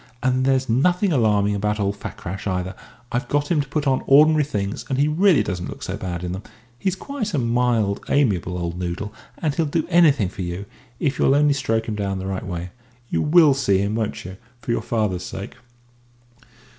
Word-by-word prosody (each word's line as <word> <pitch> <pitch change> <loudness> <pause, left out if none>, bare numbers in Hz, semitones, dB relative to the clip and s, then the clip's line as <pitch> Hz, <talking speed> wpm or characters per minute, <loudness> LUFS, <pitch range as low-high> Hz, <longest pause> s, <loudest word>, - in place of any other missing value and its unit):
And 130 0 +2
there's 130 -1 +2
nothing 175 - +2
alarming 105 -5 +2
about 105 +1 -1
old 100 0 0
Fakrash, 95 -1 -6
either, 90 0 -2 0.4
I've 120 +2 -1
got 145 +3 0
him 155 -4 +3
to 140 - -6
put 145 +1 -2
on 130 -1 +2
ordinary 150 +2 +6
things, 100 -7 -3
and 135 - 0
he 145 +2 +3
really 160 - +4
doesn't 90 -3 -4
look - - -8
so - - -3
bad 90 -2 -5
in 90 - -3
them. 95 +2 -4 0.4
He's 190 -1 0
quite 215 - -4
a - - +1
mild, 115 -4 +1
amiable 95 - +1
old 85 0 -4
noodle, 90 +4 -4 0.2
and 155 -3 -1
he'll 160 +1 0
do 160 +2 0
anything 150 - +4
for 95 - -8
you, 90 +2 -4 0.3
if 140 -3 -1
you'll 135 - +4
only 145 0 +4
stroke 115 -5 -1
him 110 - -2
down 100 -2 -2
the 95 - -5
right 95 -1 -4
way. 90 -1 -5 0.4
You 80 - 0
will 155 - +6
see 125 -8 +2
him, 100 +2 0
won't 110 -5 -3
you, 95 +1 -8 0.2
for 120 - -4
your - - 0
father's 105 -6 -1
sake?" 95 +2 -7
115 Hz, 205 wpm, -22 LUFS, 95-145 Hz, 0.4 s, ordinary